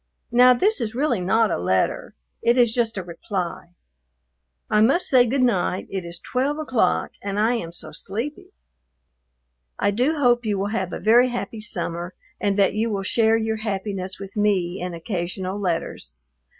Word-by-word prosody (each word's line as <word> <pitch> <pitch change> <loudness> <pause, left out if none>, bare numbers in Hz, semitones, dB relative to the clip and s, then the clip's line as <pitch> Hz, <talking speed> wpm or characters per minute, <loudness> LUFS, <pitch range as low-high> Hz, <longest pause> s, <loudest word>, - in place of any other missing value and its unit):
Now 250 +1 +7
this 400 - +2
is 225 -1 -3
really 255 -5 +1
not 220 +4 +2
a - - -1
letter; 95 +1 0 0.3
it 235 +2 +3
is 240 -3 +4
just 230 -3 0
a 190 - -3
reply. 175 0 -5 0.9
I 210 - +3
must 275 +11 +4
say 250 -2 +5
good 260 +2 +1
night; 190 -6 +1
it 190 -2 -3
is 170 0 -8
twelve 270 +4 -1
o'clock, 275 -7 0
and 200 0 -3
I 225 +3 +3
am 170 -7 -6
so 170 - -7
sleepy. 235 +10 -6 1.3
I - - +1
do 255 +10 +1
hope 245 -3 +3
you 210 -3 -1
will 200 +1 -1
have 185 -6 -2
a - - -4
very 240 +4 +5
happy 230 -3 -4
summer, 175 -4 -4 0.2
and 200 -1 0
that 195 -2 +3
you 220 +2 0
will 200 -2 -2
share 225 +3 +3
your 220 0 -1
happiness 195 -3 -3
with 195 0 -9
me 195 -4 +1
in 180 -1 -4
occasional 185 +2 -4
letters. 170 - -3
210 Hz, 175 wpm, -23 LUFS, 185-240 Hz, 1.3 s, Now